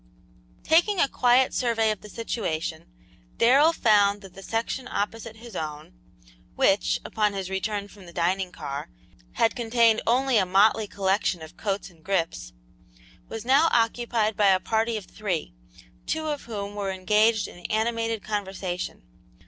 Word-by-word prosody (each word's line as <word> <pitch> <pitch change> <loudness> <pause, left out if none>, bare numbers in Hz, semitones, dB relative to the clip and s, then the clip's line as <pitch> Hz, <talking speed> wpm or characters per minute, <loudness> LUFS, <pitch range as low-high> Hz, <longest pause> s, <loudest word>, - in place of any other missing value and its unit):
Taking 345 +5 +3
a 280 - +4
quiet 250 0 +3
survey 225 -3 +1
of 215 - -5
the 210 - -11
situation, 195 - -3 0.5
Darrell 275 +7 +5
found 205 -7 +3
that 195 - -12
the 195 - -11
section 230 +5 -3
opposite 225 +2 -3
his 225 -2 -12
own 150 - -6 0.6
which, 195 - +2
upon 210 -2 0
his 190 -1 -4
return 200 +1 -2
from 200 -3 -15
the - - -11
dining 180 +2 0
car, 140 - -6 0.4
had 225 - +2
contained 230 -1 +3
only 250 0 +3
a 190 - +2
motley 210 +3 +4
collection 195 -3 0
of 160 - -12
coats 195 -2 -3
and 165 -2 -24
grips 165 - -2 0.8
was 225 0 -6
now 275 +6 +5
occupied 230 -1 +1
by 205 - +3
a 190 -1 +4
party 225 +2 0
of 205 - -7
three, 185 - -4 0.5
two 315 -1 -1
of 295 -2 -4
whom 205 -3 -5
were 200 -1 -3
engaged 210 +3 +2
in - - -12
animated 225 0 -1
conversation. 190 - -4
215 Hz, 150 wpm, -26 LUFS, 190-230 Hz, 0.8 s, Darrell